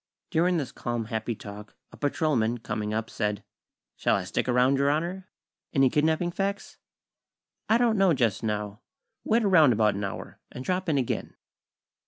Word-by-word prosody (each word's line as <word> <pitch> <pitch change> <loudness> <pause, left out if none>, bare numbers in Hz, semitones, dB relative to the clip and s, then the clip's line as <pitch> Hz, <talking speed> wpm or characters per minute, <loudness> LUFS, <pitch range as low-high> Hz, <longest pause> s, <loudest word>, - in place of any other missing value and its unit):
During 175 +2 +2
this 140 -6 -3
calm, 120 -1 -3
happy 110 +1 -3
talk, 105 0 -10 0.2
a - - -12
patrolman, 135 -6 +1
coming 105 -2 -4
up, 110 +1 -2
said: 105 -1 -2 0.5
"Shall - - +2
I 100 - -1
stick 95 +7 -2
around, 125 +2 +3
Your 140 0 +3
Honor? 175 +5 -2 0.4
Any 135 -4 +4
kidnapping 160 +3 +1
facts?" 200 +2 -3 0.9
"I 225 - +5
don't 235 -3 +2
know, 195 -2 +5
just 115 -7 +1
now. 105 0 -3 0.4
Wait 230 +1 +2
around 160 - +6
about 105 -1 +3
an 100 +1 -4
hour, 100 - -6
and 125 - -8
drop 185 -1 -1
in 150 - +2
again." 130 -3 -2
130 Hz, 165 wpm, -27 LUFS, 110-170 Hz, 0.9 s, around